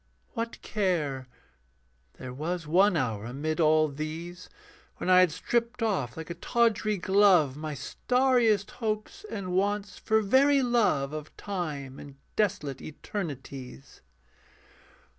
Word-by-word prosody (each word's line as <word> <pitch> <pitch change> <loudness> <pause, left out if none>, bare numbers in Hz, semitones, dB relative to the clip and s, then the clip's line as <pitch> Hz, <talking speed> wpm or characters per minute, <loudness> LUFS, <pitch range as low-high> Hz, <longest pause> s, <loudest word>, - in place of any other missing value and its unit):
What 230 0 -4
care? 155 -11 -1 0.9
There 125 -1 -8
was 165 +5 -3
one 185 +4 +4
hour 115 -7 -1
amid 150 +6 -3
all 155 -1 +4
these 160 +5 -6 0.5
When 185 - 0
I 185 - +8
had 185 -3 +5
stripped 235 +7 -1
off 185 - -1
like 160 +1 -6
a - - -2
tawdry 215 +2 +1
glove 185 -7 +4
My 155 0 -5
starriest 245 - +2
hopes 240 - -4
and 190 -3 -4
wants, 200 +1 0
for 220 0 +2
very 275 +6 +4
love 210 - +2
Of 155 0 -7
time 150 -9 -4
and 140 -1 -11 0.2
desolate 150 -10 -1
eternities. 140 - -7
180 Hz, 120 wpm, -28 LUFS, 150-215 Hz, 0.9 s, I